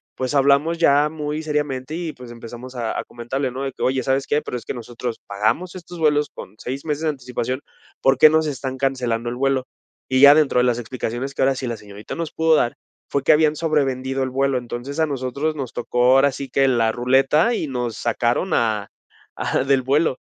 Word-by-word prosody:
pues, 130 +2 -2
hablamos 140 +4 +3
ya 150 -2 +4
muy 150 0 -4
seriamente 150 -2 -2
y, 165 -2 -4
pues, 125 -1 -12
empezamos 120 +2 -10
a 115 -2 -2
a - - -3
comentarle, 130 +3 -3
¿no? 130 +2 -5
de 135 - -2
que: - - -13
"Oye, 130 0 +1
¿sabes 135 0 0
qué?, 150 - +1
pero 125 - -4
es 120 - -9
que - - -4
nosotros 120 0 -6
pagamos 110 - -1
estos 175 -1 -9
vuelos 150 -2 +2
con 95 - -10
6 135 +4 -5
meses 150 -1 -2
de 160 - +2
anticipación, 125 -2 -3 0.4
¿por 135 0 +4
qué 155 - +9
no 160 +1 +3
se 155 - -1
están 130 -1 -5
cancelando 125 -3 -1
el 120 - -4
vuelo?", 135 -1 +1 0.4
y 130 0 +2
ya 140 +1 +10
dentro 150 -5 +3
de 125 - +3
las 120 -2 +2
explicaciones 120 +2 -4
que - - -3
ahora 135 0 +3
sí 130 - -4
la 115 -1 -3
señorita 105 0 -10
nos 165 -2 -4
pudo 160 0 +2
dar, 120 -5 +1 0.3
fue 140 - -1
que - - +5
habían 155 0 +3
sobrevendido 135 -4 0
el 130 - -2
vuelo, 135 0 +1
entonces, 125 +5 -6
a 160 - +3
nosotros 140 +3 -2
nos 135 -5 -5
tocó 120 0 0
ahora 140 +1 +5
sí 135 +1 -6
que 135 +2 +3
la 115 -3 +2
ruleta 135 - +3
y 165 - -2
nos 125 -4 -3
sacaron 120 +9 0
a 110 -3 0 0.5
a - - 0
del 135 -1 +2
vuelo. 140 +1 +2
135 Hz, 220 wpm, -21 LUFS, 125-150 Hz, 0.5 s, ya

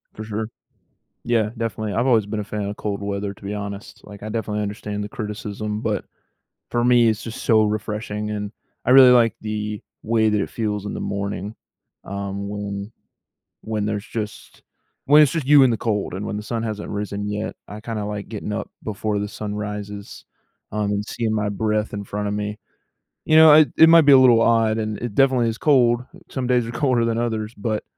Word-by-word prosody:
For 110 - -6
sure. 110 0 -4 0.8
Yeah, 115 -3 +1
definitely. 110 -2 -3
I've 120 +3 +1
always 115 -5 +4
been 105 +1 -4
a - - -2
fan 105 +1 -4
of 105 - -6
cold 100 -1 -3
weather 100 0 -3
to - - -20
be 100 +1 -4
honest, 100 -1 -7
like, 100 -1 -12
I 110 - -5
definitely 105 -1 -2
understand 105 0 -4
the 105 - -6
criticism, 105 0 -5
but - - -2 0.6
for 120 0 0
me, 120 -1 +5
it's 110 0 -2
just 115 - -7
so 110 -1 +4
refreshing, 105 0 -3
and 105 -1 -4 0.3
I 125 - +2
really 130 -1 +9
like 115 -3 +5
the 105 -1 -4 0.2
way 110 -1 +2
that 105 -1 +1
it - - -3
feels 105 -3 -3
in 105 - -4
the - - -4
morning, 100 +1 -4 0.5
um, 100 0 -5
when 100 0 -5 0.7
when 110 -2 -2
there's 105 0 -3
just 105 -3 -7 0.4
when 150 +2 +7
it's 150 - +5
just 160 -5 -2
you 145 -1 +8
in 130 - +5
the 115 - 0
cold, 105 -5 -2
and 100 +2 -4
when 105 - -3
the - - -4
sun 115 +1 -3
hasn't 110 -2 -4
risen 105 0 -3
yet, 105 +1 -3
I 105 +1 -9
kinda 110 -2 -4
like 105 -1 -5
getting 105 -1 -5
up 105 - -4
before 105 0 -2
the 105 - -2
sun 105 -1 -5
rises, 105 0 -6 0.5
um, 105 -1 -1
and 105 0 -1
seeing 110 0 -2
my 105 -1 0
breath 105 +1 -1
in 100 0 -4
front 105 +1 -4
of 100 - -2
me. 105 0 -3 0.7
You 155 - +3
know, 160 -1 +9
it 155 -1 +6
it 160 - +9
might 165 0 +8
be 145 -1 +6
a 135 - +9
little 120 -3 +6
odd, 115 -1 +3
and 110 -1 -3
it 120 -3 -5
definitely 130 -2 +3
is 115 0 -3
cold, 125 -4 +3 0.3
some 130 -2 -3
days 125 -2 +2
are 115 - -6
colder 125 -3 +1
than 115 0 0
others, 110 -1 -2
but 105 +1 -2
105 Hz, 210 wpm, -22 LUFS, 105-115 Hz, 0.8 s, really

